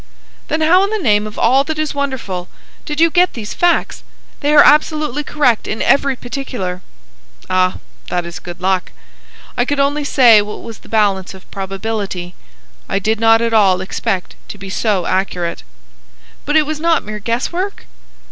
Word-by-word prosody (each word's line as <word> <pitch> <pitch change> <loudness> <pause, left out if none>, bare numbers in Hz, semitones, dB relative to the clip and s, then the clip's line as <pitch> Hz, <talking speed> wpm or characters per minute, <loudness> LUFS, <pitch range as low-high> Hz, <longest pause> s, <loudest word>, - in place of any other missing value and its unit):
"Then 315 +1 -1
how 355 +5 +5
in 400 - 0
the 435 - -1
name 210 - +2
of 210 - -10
all 265 +4 +4
that 315 0 -3
is 310 -1 -1
wonderful 260 -11 -3 0.4
did 295 -1 -4
you 330 0 +4
get 360 +2 +3
these 215 -3 -6
facts? 350 -1 +1 0.4
They 290 - 0
are 300 -1 +8
absolutely 300 -1 +3
correct 260 -7 +1
in 215 - -3
every 275 0 +2
particular." 245 -8 -5 0.7
"Ah, 185 0 +2 0.3
that 175 -1 -2
is 170 +1 -7
good 175 -1 -9
luck. 185 0 0 0.6
I 245 - +2
could 285 +3 -2
only 285 +2 +1
say 245 -6 +6
what 210 +1 -7
was 230 -2 -9
the - - -18
balance 200 -4 +1
of 190 - -17
probability. 195 -2 -4 0.6
I - - 0
did 215 +2 0
not 225 0 +4
at 230 -1 0
all 195 -4 +4
expect 190 0 -3
to - - -9
be 195 -1 -8
so 195 -4 0
accurate." 180 -2 -1 0.8
"But 295 - -1
it 305 - +4
was 305 0 -4
not 330 -1 +2
mere 210 0 -6
guess 230 +4 -2
work?" 380 +3 -4
225 Hz, 175 wpm, -17 LUFS, 195-295 Hz, 0.8 s, are